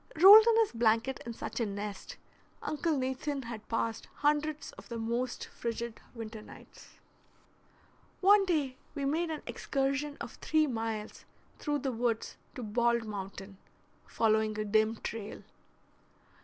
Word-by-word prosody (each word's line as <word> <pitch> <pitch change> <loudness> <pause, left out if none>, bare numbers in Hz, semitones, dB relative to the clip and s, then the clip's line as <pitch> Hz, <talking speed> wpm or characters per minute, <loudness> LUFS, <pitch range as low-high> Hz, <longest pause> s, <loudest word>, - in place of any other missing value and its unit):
Rolled 415 +5 +11
in 460 -1 +5
his 445 - +1
blanket 230 +3 +1
in 235 - -4
such - - -5
a 230 - +1
nest, 205 0 -6 0.5
Uncle 305 +1 0
Nathan 265 +2 -2
had 230 -2 -8
passed 225 0 -2
hundreds 300 +1 0
of - - -14
the 235 - -4
most 235 +2 -2
frigid 235 0 -5
winter 220 -1 -7
nights. - - -15 1.2
One 400 +1 +6
day 285 -7 0 0.2
we 280 -2 -2
made 325 +4 0
an 310 -2 -4
excursion 275 +1 -1
of - - -6
three 310 0 +2
miles 225 -4 -4 0.3
through 295 -2 -1
the 265 - +1
woods 230 -1 -1 0.2
to 250 - -5
Bald 235 +1 +1
Mountain, 195 -1 -7 0.5
following 220 -1 +1
a 215 - -1
dim 215 +2 +2
trail. 220 -1 -6
235 Hz, 140 wpm, -31 LUFS, 220-290 Hz, 1.2 s, Rolled